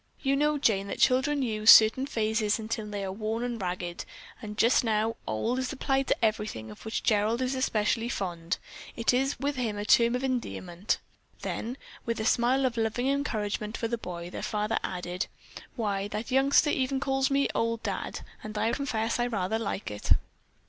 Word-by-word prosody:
"You 275 0 +2
know, 300 +1 +2
Jane, 200 -8 +2
that - - -4
children 270 +2 +3
use 215 -2 +1
certain 225 +5 +8
phrases 220 -4 +1
until 220 -1 -4
they 205 -1 -4
are 190 - -3
worn 225 +4 -3
ragged, 180 -2 -3 0.4
and 210 -1 -7
just 230 +4 +4
now 220 0 +1
'old' 170 - -1
is 260 -1 -2
applied 270 -1 0
to - - +2
everything 210 - -2
of 105 - -13
which 220 - -2
Gerald 215 +1 +2
is 260 0 0
especially 230 -2 0
fond. 175 -5 -2 0.4
It 230 +1 +2
is 270 +2 +1
with 285 0 -1
him 225 -5 -1
a 205 - -3
term 235 +2 +5
of 250 - -2
endearment." 210 -8 -2 0.5
Then, 245 +4 -3 0.3
with 230 -1 -2
a 220 - -2
smile 250 +3 +3
of 245 -2 -1
loving 230 +3 0
encouragement 215 -6 -1
for 230 - -1
the 235 - -1
boy, 175 -5 -7
their - - -5
father 210 +1 -1
added: 180 0 -3 0.5
"Why, 200 -4 -1
that 215 +4 -5
youngster 275 +3 +4
even 265 0 0
calls 270 0 +1
me 275 0 +2
'old 230 0 -1
Dad' - - -3 0.2
and 215 0 -7
I 225 - +1
confess 230 -5 -1
I 240 - +2
rather 220 -1 -1
like 200 - -3
it." 105 - +2
225 Hz, 185 wpm, -28 LUFS, 210-255 Hz, 0.5 s, certain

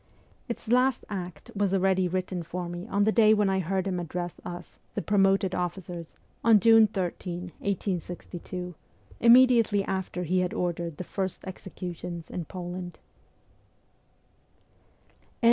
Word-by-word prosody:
Its 235 - -5
last 250 +2 +3
act 180 -5 -6
was 200 -1 +1
already 190 -1 +3
written 185 0 -2
for 175 +2 -5
me 175 +3 -6
on 200 -2 +2
the 215 - +4
day 220 -1 +6
when 205 -2 +2
I 190 - +1
heard 190 +1 -1
him 185 -2 -1
address 175 +1 -5
us, 175 0 -8 0.2
the - - 0
promoted 195 -1 +3
officers, 175 -2 -4 0.3
on 225 -2 +7
June 225 +1 +7
13, 180 -1 -4
1862, 180 -1 -4 0.5
immediately 235 -4 +6
after 190 -2 -3
he 180 +2 +1
had 180 -1 -1
ordered 170 -3 -2
the - - -4
first 190 +1 -4
executions 175 -2 -7
in 175 - -4
Poland. 180 0 -6
185 Hz, 130 wpm, -28 LUFS, 175-200 Hz, 0.5 s, on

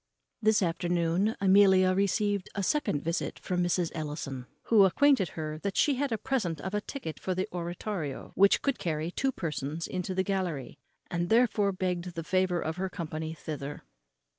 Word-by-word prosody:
This 215 -2 +4
afternoon 175 +3 +1
Amelia 190 -1 +5
received 200 0 +1
a 200 - -1
second 190 - 0
visit 165 +2 -2
from 180 -1 -2
Mrs. 175 -1 0
Ellison, 145 -5 -5 0.2
who 220 -3 +5
acquainted 255 - +4
her 155 -1 -4
that 200 +2 -3
she 290 - +4
had 275 0 -1
a 225 - +1
present 215 - -1
of 190 +6 -5
a 210 - 0
ticket 210 - -6
for 185 - -2
the 185 - -1
oratorio, 175 -3 -4
which 200 +1 +5
would 275 -2 +1
carry 160 0 -2
two 270 +8 0
persons 155 - -3
into 185 0 -3
the 190 - +2
gallery; 180 -10 -3 0.3
and 175 -1 -1
therefore 220 -3 +3
begged 180 -2 -3
the 165 - -3
favour 185 0 +1
of 160 +1 -3
her 190 +1 -2
company 160 -2 -5
thither. 145 -2 -6
180 Hz, 170 wpm, -29 LUFS, 165-200 Hz, 0.3 s, Amelia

